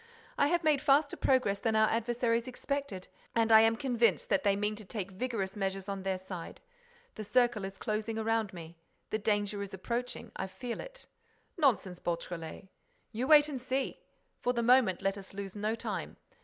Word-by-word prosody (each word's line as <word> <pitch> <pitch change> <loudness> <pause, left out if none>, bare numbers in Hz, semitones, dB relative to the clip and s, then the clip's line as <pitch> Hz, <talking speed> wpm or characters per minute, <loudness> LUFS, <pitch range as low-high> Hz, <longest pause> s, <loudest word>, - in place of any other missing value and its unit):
I 285 - +3
have 345 +2 +1
made 300 -3 +3
faster 285 +1 +3
progress 250 -7 +2
than 220 +2 0
our 220 0 +5
adversaries 230 +1 0
expected 265 -6 -4 0.3
and 225 -1 +3
I 220 0 +9
am 225 0 +4
convinced 235 - +1
that 195 - +2
they 200 -1 +3
mean 210 +1 -1
to 215 - -8
take 195 -1 -5
vigorous 200 -2 -3
measures 195 -1 -2
on 195 -1 -3
their 190 0 -1
side. 185 -2 -8 0.5
The 215 - -6
circle 240 -1 +2
is 195 0 -7
closing 220 +1 -2
around 225 -2 0
me. 170 -2 -10 0.3
The 215 - 0
danger 205 -1 0
is 200 -1 -5
approaching. 240 +6 -4
I 190 - -3
feel 210 +6 -6
it." - - -9 0.5
"Nonsense, 220 - +1
Beautrelet—" 170 +1 -5 0.4
"You 235 +4 -2
wait 300 -1 +7
and 270 -4 -5
see! 260 +1 -2 0.4
For 245 - 0
the 235 -1 0
moment, 230 -7 +4
let 195 +1 0
us 195 0 -11
lose 195 -1 -6
no 210 +2 -1
time. 230 - -5
220 Hz, 180 wpm, -31 LUFS, 195-245 Hz, 0.5 s, I